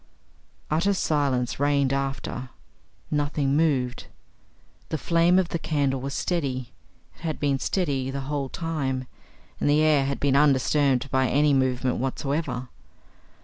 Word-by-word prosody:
Utter 180 Hz, +6 st, +2 dB
silence 140 Hz, -8 st, 0 dB
reigned 140 Hz, -1 st, +2 dB
after. 135 Hz, -2 st, -3 dB, 0.6 s
Nothing 145 Hz, -1 st, 0 dB
moved. 135 Hz, -6 st, 0 dB, 0.8 s
The 160 Hz, -, -1 dB
flame 170 Hz, +3 st, +3 dB
of 185 Hz, -2 st, +2 dB
the 170 Hz, -, -2 dB
candle 140 Hz, -5 st, 0 dB
was 140 Hz, +1 st, -4 dB
steady. 135 Hz, -8 st, -2 dB, 0.4 s
It -, -, -23 dB
had 160 Hz, -2 st, -3 dB
been 140 Hz, -2 st, +1 dB
steady 140 Hz, -9 st, -1 dB
the 135 Hz, +1 st, -3 dB
whole 140 Hz, 0 st, -3 dB
time, 140 Hz, -6 st, -2 dB, 0.5 s
and -, -, +1 dB
the 150 Hz, +1 st, +4 dB
air 150 Hz, -3 st, +4 dB
had 140 Hz, 0 st, -2 dB
been 140 Hz, -1 st, +2 dB
undisturbed 140 Hz, -1 st, +3 dB
by 130 Hz, -1 st, +2 dB
any 145 Hz, +3 st, +3 dB
movement 130 Hz, -1 st, +1 dB
whatsoever. 135 Hz, -1 st, -2 dB
140 Hz, 135 wpm, -25 LUFS, 130-150 Hz, 0.8 s, the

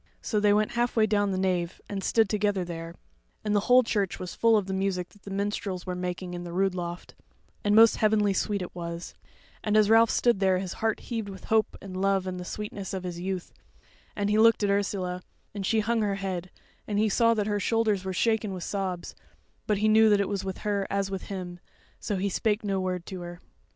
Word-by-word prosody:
So 215 Hz, -, -1 dB
they 205 Hz, 0 st, +4 dB
went 210 Hz, +1 st, +2 dB
halfway 240 Hz, -2 st, +2 dB
down 205 Hz, -1 st, +1 dB
the 190 Hz, -, -1 dB
nave, 185 Hz, -2 st, -1 dB
and 195 Hz, -2 st, -4 dB
stood 225 Hz, +2 st, +3 dB
together 205 Hz, -2 st, 0 dB
there; 165 Hz, -1 st, -7 dB, 0.5 s
and 210 Hz, 0 st, +1 dB
the -, -, +5 dB
whole 250 Hz, +1 st, +7 dB
church 205 Hz, -5 st, -1 dB
was 180 Hz, -, -6 dB
full 230 Hz, -1 st, +4 dB
of 205 Hz, -, 0 dB
the 190 Hz, -, -4 dB
music 190 Hz, -2 st, -1 dB
that 205 Hz, -, -22 dB
the 200 Hz, -, -10 dB
minstrels 200 Hz, -2 st, -3 dB
were 180 Hz, -, -3 dB
making 180 Hz, 0 st, -4 dB
in 175 Hz, 0 st, -5 dB
the 175 Hz, -, -7 dB
rood 190 Hz, +1 st, +1 dB
loft, 175 Hz, -1 st, -6 dB, 0.5 s
and 205 Hz, 0 st, +3 dB
most 225 Hz, 0 st, +7 dB
heavenly 210 Hz, -2 st, +3 dB
sweet 200 Hz, 0 st, -1 dB
it 180 Hz, -, -8 dB
was; 170 Hz, -1 st, -6 dB, 0.5 s
and 210 Hz, 0 st, +2 dB
as 215 Hz, 0 st, +4 dB
Ralph 225 Hz, 0 st, +6 dB
stood 240 Hz, -5 st, +2 dB
there 190 Hz, -1 st, +3 dB
his 185 Hz, -1 st, -4 dB
heart 220 Hz, -1 st, 0 dB
heaved 225 Hz, -4 st, -4 dB
with 190 Hz, -1 st, -10 dB
hope 220 Hz, 0 st, +1 dB
and 190 Hz, -2 st, -8 dB
love 195 Hz, -1 st, +2 dB
and 185 Hz, -1 st, -4 dB
the 180 Hz, -, -6 dB
sweetness 205 Hz, -1 st, -5 dB
of 185 Hz, -, -4 dB
his 175 Hz, -1 st, -5 dB
youth; 185 Hz, 0 st, -4 dB, 0.6 s
and 205 Hz, 0 st, 0 dB
he 215 Hz, -, +3 dB
looked 230 Hz, -1 st, +5 dB
at 200 Hz, -, +2 dB
Ursula, 190 Hz, -3 st, -1 dB, 0.3 s
and 200 Hz, -2 st, -3 dB
she 220 Hz, -1 st, +2 dB
hung 230 Hz, +1 st, 0 dB
her 205 Hz, -2 st, 0 dB
head, 185 Hz, -2 st, -4 dB, 0.4 s
and 205 Hz, -, -1 dB
he 215 Hz, +1 st, +3 dB
saw 230 Hz, +2 st, +3 dB
that 210 Hz, -2 st, 0 dB
her 205 Hz, -1 st, 0 dB
shoulders 215 Hz, -3 st, +1 dB
were 190 Hz, -, -3 dB
shaken 220 Hz, +1 st, +1 dB
with 180 Hz, -2 st, -5 dB
sobs; 190 Hz, -3 st, -3 dB, 0.5 s
but 210 Hz, -, +2 dB
he 215 Hz, +2 st, +2 dB
knew 220 Hz, 0 st, +6 dB
that 205 Hz, -1 st, +4 dB
it 200 Hz, -, +1 dB
was 195 Hz, -2 st, -2 dB
with 190 Hz, -1 st, -4 dB
her 200 Hz, -2 st, 0 dB
as 195 Hz, 0 st, -1 dB
with 190 Hz, -1 st, -4 dB
him, 180 Hz, -3 st, -6 dB, 0.4 s
so 205 Hz, -, -2 dB
he 195 Hz, +1 st, -1 dB
spake 210 Hz, +2 st, 0 dB
no 195 Hz, -2 st, 0 dB
word 180 Hz, -2 st, -3 dB
to 185 Hz, -2 st, -7 dB
her. 175 Hz, 0 st, -8 dB
200 Hz, 230 wpm, -27 LUFS, 185-210 Hz, 0.6 s, whole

